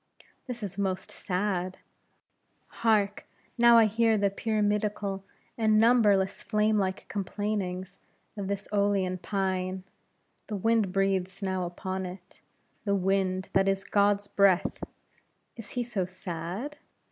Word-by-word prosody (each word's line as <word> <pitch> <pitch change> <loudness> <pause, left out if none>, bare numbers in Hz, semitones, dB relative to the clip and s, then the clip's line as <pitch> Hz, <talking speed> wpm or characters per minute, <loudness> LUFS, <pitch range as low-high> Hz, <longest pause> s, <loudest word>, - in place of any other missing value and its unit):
This 240 -3 -5
is 200 0 -5
most 190 -2 -2
sad. 185 -1 -2 1.0
Hark, 210 -3 +2 0.3
now 235 0 +8
I 225 - +7
hear 225 +1 +3
the 200 -1 +2
pyramidical 210 -2 -1 0.4
and 215 -1 +4
numberless, 205 -5 +4
flame 215 0 +2
like 190 -1 -2
complainings 195 -2 -3 0.4
of 200 -2 -4
this 200 0 -3
Eolean 195 -3 +1
pine; 185 0 -2 0.6
the 215 - -3
wind 225 -1 +2
breathes 195 0 0
now 185 -2 -1
upon 185 +2 -4
it: 180 +1 -12 0.4
the 200 -2 +1
wind, 190 -1 0
that 195 0 +3
is 195 0 +1
God's 205 0 +2
breath! 200 -3 +2 0.7
Is 230 -3 -9
He 245 - +2
so 215 -6 -2
sad? 185 - -5
200 Hz, 125 wpm, -28 LUFS, 185-210 Hz, 1.0 s, now